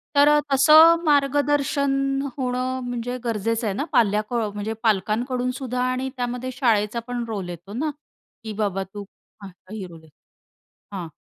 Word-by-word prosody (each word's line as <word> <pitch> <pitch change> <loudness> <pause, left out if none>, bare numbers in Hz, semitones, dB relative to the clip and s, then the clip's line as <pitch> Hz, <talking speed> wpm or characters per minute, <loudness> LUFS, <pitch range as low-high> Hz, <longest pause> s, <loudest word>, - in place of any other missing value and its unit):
तर 285 +1 +6
अ, 295 0 +5
तसं 320 +4 +7
मार्गदर्शन 280 -1 +1 0.2
होणं 255 0 -2
म्हणजे 245 +1 -3
गरजेचं 225 0 -1
आहे 195 - -1
ना 285 - -1
पाल्य 210 -2 +3
क - - -7 0.2
म्हणजे 210 +2 -3
पालकांकडूनसुद्धा 250 +4 -1
आणि 260 +1 -2
त्यामध्ये 250 +1 -3
शाळेचा 225 -3 +1
पण 245 -1 -3
रोल 195 -5 -4
येतो 175 +4 -9
ना, 305 +6 -1 0.5
की 220 -1 -5
बाबा 200 -2 -1
तू 205 -1 -6 0.7
ही 210 -4 -5
रोल 165 -2 -13
आहे. 160 - -18 0.9
हां. 170 -2 -5
245 Hz, 145 wpm, -23 LUFS, 210-270 Hz, 0.9 s, तसं